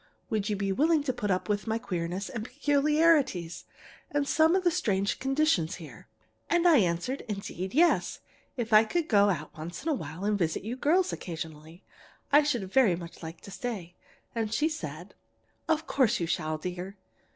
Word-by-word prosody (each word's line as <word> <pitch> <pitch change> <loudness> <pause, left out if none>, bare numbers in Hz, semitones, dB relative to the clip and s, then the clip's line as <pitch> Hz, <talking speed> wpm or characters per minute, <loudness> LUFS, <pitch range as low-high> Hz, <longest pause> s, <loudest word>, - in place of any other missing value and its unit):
Would 215 -1 0
you 210 - 0
be 195 0 -1
willing 305 - +3
to 265 -3 -1
put 205 -3 -3
up 185 -1 0
with 210 +1 -1
my 220 0 0
queerness 185 -4 -3
and 230 -5 -5
peculiarities, 285 - +2 0.4
and 290 -1 0
some 320 +4 +4
of 380 - +1
the 350 - +3
strange 200 -8 0
conditions 270 - +1
here?' 150 -12 -12 0.4
And 345 +1 +3
I 330 -4 +7
answered, 185 +6 0
indeed, 195 -1 -5
yes; 340 +3 +3 0.4
if 230 -2 -2
I 215 +1 +8
could 330 +8 -1
go 205 -4 +4
out 155 -5 -3
once 170 +8 -7
in 330 - -1
a - - +3
while 165 - -5
and 210 -1 +1
visit 160 -1 -1
you 225 +4 -4
girls 340 +8 +2
occasionally, 160 0 -7 0.5
I 290 +1 +7
should 240 -11 -2
very 240 -10 +5
much 170 -1 -10
like 160 0 -8
to 200 - -11
stay. 195 -6 -5 0.4
And 225 -2 -2
she 295 +8 +1
said: 170 - -7 0.6
"'Of 320 0 +1
course 260 -8 +2
you 170 - 0
shall, 155 -1 -1
dear. 180 +4 -6
210 Hz, 185 wpm, -28 LUFS, 175-285 Hz, 0.6 s, I